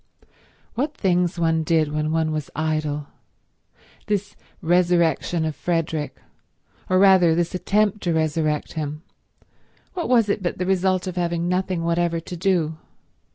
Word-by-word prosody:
What 290 +5 -2
things 180 -2 +1
one 165 -1 +2
did 155 -1 +1
when 155 0 -1
one 160 -1 +1
was 155 -2 -3
idle. 155 -2 -2 1.0
This 205 -1 -2 0.2
resurrection 170 -1 +2
of 155 -1 -3
Frederick, 165 -3 -2 0.7
or 185 - +3
rather 185 -4 +6
this 170 0 0
attempt 205 +2 +1
to 175 - 0
resurrect 155 -1 0
him, 150 0 -4 0.9
what 350 -3 -3
was 235 -4 +4
it 205 0 0
but 175 - -2
the 185 - -2
result 185 0 +1
of 185 -1 -5
having 170 -1 -1
nothing 180 -1 -1
whatever 170 0 0
to 175 +2 -8
do? 165 -3 0
170 Hz, 140 wpm, -23 LUFS, 160-185 Hz, 1.0 s, rather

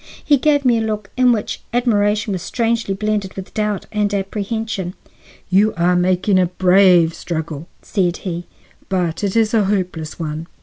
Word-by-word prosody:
He 290 -3 +4
gave 290 -1 +2
me 240 -2 +4
a - - -1
look 215 -2 -3
in 250 -1 +4
which 220 -3 -2
admiration 210 -3 +1
was 185 - -3
strangely 230 0 -1
blended 210 -1 -2
with 190 0 -8
doubt 210 -2 -1
and 210 -1 0
apprehension. 200 -1 -3 0.6
"You 205 +3 +3
are 175 +1 +3
making 185 +2 +2
a 180 - +3
brave 180 -2 +4
struggle," 160 -2 -5 0.2
said 180 -4 0
he, 175 -1 -4 0.4
"but 180 -2 -1
it 200 0 -1
is 225 -1 +2
a 215 -3 +3
hopeless 180 -6 -2
one." 160 0 -4
195 Hz, 165 wpm, -19 LUFS, 180-215 Hz, 0.6 s, He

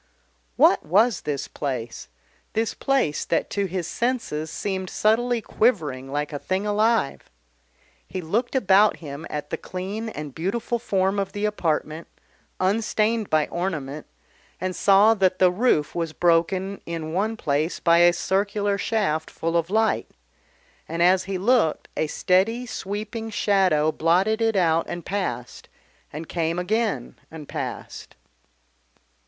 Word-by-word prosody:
What - - +5
was 210 +9 +3
this 140 -2 -3
place? 125 -5 -5 0.5
this 225 0 0
place 265 - 0
that 165 - -1
to 200 -1 0
his 180 -1 -3
senses 200 -7 -2
seemed 190 +1 -3
subtly 235 +2 +1
quivering 145 - 0
like 145 +1 -2
a 145 - -3
thing 190 +6 -2
alive? 210 -6 +1 0.8
He 185 - -5
looked 220 +10 -1
about 205 -3 +4
him 150 0 -8
at 150 0 -5
the - - -1
clean 200 +5 -5
and 150 -8 -7
beautiful 225 - -2
form 195 -3 0
of 195 -1 -3
the 205 +1 -2
apartment, 165 -5 -1 0.5
unstained 215 +2 +1
by 155 -1 +3
ornament, 155 -5 -4 0.5
and 185 0 -3
saw 200 +3 +5
that 190 -3 +2
the 185 -1 +5
roof 180 -7 +1
was 165 -2 -3
broken 180 +4 +1
in 165 -2 -4
one 215 +5 0
place 150 +1 -1
by 170 0 +4
a 175 0 +7
circular 200 +3 0
shaft 185 -8 0
full 165 +1 -3
of 170 0 +1
light, 220 +1 +1 0.8
and, 165 +1 0
as 185 +1 +4
he 195 0 -3
looked, 210 -5 +2
a 155 - 0
steady, 200 +10 +1
sweeping 220 +1 -5
shadow 190 -8 +2
blotted 185 +8 +2
it 225 -1 +2
out 165 -3 +2
and 175 -1 -5
passed, 125 -12 -4 0.4
and 155 +2 -7
came 165 0 -1
again 215 +5 -1
and 155 -3 -10
passed. - - -6
185 Hz, 140 wpm, -24 LUFS, 160-215 Hz, 0.8 s, a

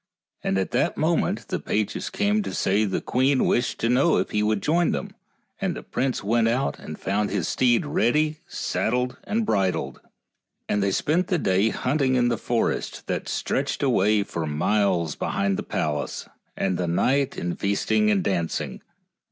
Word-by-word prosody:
And 95 - 0
at 95 - -1
that - - +1
moment - - 0
the - - -1
pages 105 -1 -2
came 210 +1 +1
to - - -5
say 100 +3 +2
the 95 - -1
queen 130 +2 +2
wished 120 +1 +1
to 115 - +2
know 135 +7 +3
if - - -1
he 105 - +1
would 105 -1 0
join 170 +3 +2
them, 200 - -4 0.5
and 190 -3 -1
the - - -7
prince 130 -4 -2
went 115 +2 +2
out 125 +4 0
and 80 - -8
found 100 +2 -1
his 95 -5 -1
steed 125 +4 +2
ready 150 +4 +1
saddled 125 +2 -1
and 220 +1 0
bridled, 95 - 0 0.7
and 105 - +1
they 100 - +2
spent 160 - +1
the 180 - +1
day 95 - +2
hunting 130 +2 0
in 120 -1 +3
the 120 - 0
forest 120 -2 -1
that - - -3
stretched - - -1
away 105 +2 +3
for 85 -5 -4
miles 85 +1 +1
behind 100 -1 0
the - - -2
palace, 75 -1 -3 0.3
and 95 -2 0
the 90 - 0
night 130 +11 +1
in 85 0 -2
feasting 100 - +1
and 200 -3 +2
dancing. 85 -4 -2
115 Hz, 175 wpm, -24 LUFS, 95-140 Hz, 0.7 s, know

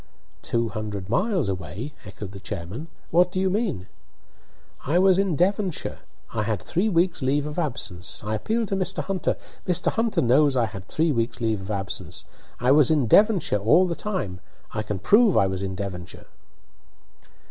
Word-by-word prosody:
"Two 115 -1 0
hundred 105 -3 -5
miles 185 - +1
away!" 95 - -5
echoed 95 0 -8
the 100 - -9
chairman. 95 - -6 0.2
"What 180 +2 +4
do 185 - -2
you 190 0 +1
mean?" 195 - -1 1.0
"I 155 +6 +1
was 190 0 +5
in 195 -5 +1
Devonshire. 190 +2 0 0.3
I 115 - 0
had 105 -2 -1
three 180 - 0
weeks' 175 -3 +1
leave 140 +2 +1
of 150 +3 -4
absence 100 - -3
I 105 +1 -2
appeal 220 - 0
to 200 - -2
Mr. 185 -4 -1
Hunter 195 +1 -1 0.3
Mr. 180 -2 +3
Hunter 225 -6 +1
knows 135 +3 +4
I 120 - +3
had 100 -4 -8
three 160 +1 +1
weeks' 115 -3 -1
leave 110 -4 0
of 95 - -8
absence! 95 -3 -5 0.3
I 125 +1 +3
was 145 -2 +6
in 150 -5 +3
Devonshire 200 - +4
all 150 - +5
the 175 - -1
time; 170 - -3 0.3
I 110 - -1
can 105 -2 -3
prove 210 - +4
I - - +5
was 95 0 -2
in 95 -1 -3
Devonshire!" 90 -3 -6
130 Hz, 175 wpm, -24 LUFS, -, 1.0 s, was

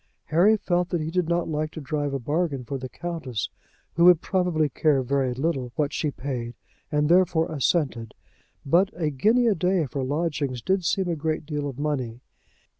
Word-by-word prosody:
Harry 190 +8 +5
felt 180 -3 0
that 175 - 0
he 155 +1 -3
did 180 -2 0
not 170 0 +1
like 155 0 -1
to 160 - -8
drive 145 -1 -2
a 135 - -1
bargain 145 +1 -1
for 135 +3 -5
the 130 0 -6
Countess, 160 - -4 0.4
who 170 - +4
would 180 -3 +8
probably 180 -5 +1
care 145 -1 +2
very 135 0 0
little 135 -3 -1
what 150 -1 0
she 150 - 0
paid, 125 -4 -5 0.4
and 150 0 +2
therefore 170 -2 +3
assented. 135 -6 0 0.5
But 175 +7 +4
a 155 -3 0
guinea 220 - +3
a 225 - +4
day 180 -1 +1
for 135 0 -4
lodgings 145 -3 -2
did 190 -1 +1
seem 190 +2 +1
a 170 - 0
great 155 0 -2
deal 145 -1 -3
of 130 - -9
money. 135 -6 -2
155 Hz, 190 wpm, -25 LUFS, 135-175 Hz, 0.5 s, would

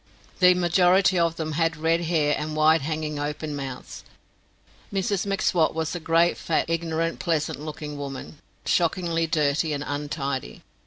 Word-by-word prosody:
The 180 -1 +6
majority 180 +1 +3
of 165 -1 +2
them 160 -1 -3
had 165 +1 0
red 165 +2 +1
hair 155 -3 +2
and 155 0 -4
wide 155 +1 +4
hanging 155 0 -3
open 150 +1 -3
mouths. 135 -2 -7 0.9
Mrs 200 0 -1
M'Swat 180 -5 +1
was 160 -1 -2
a 175 - -3
great, 165 +1 +2
fat, 165 - 0
ignorant, 165 0 -1
pleasant 160 -5 -1
looking 150 -1 -6
woman, 140 +1 -7 0.3
shockingly 170 -1 +1
dirty 155 0 +1
and 145 0 -3
untidy. 145 - -4
160 Hz, 145 wpm, -25 LUFS, 150-170 Hz, 0.9 s, The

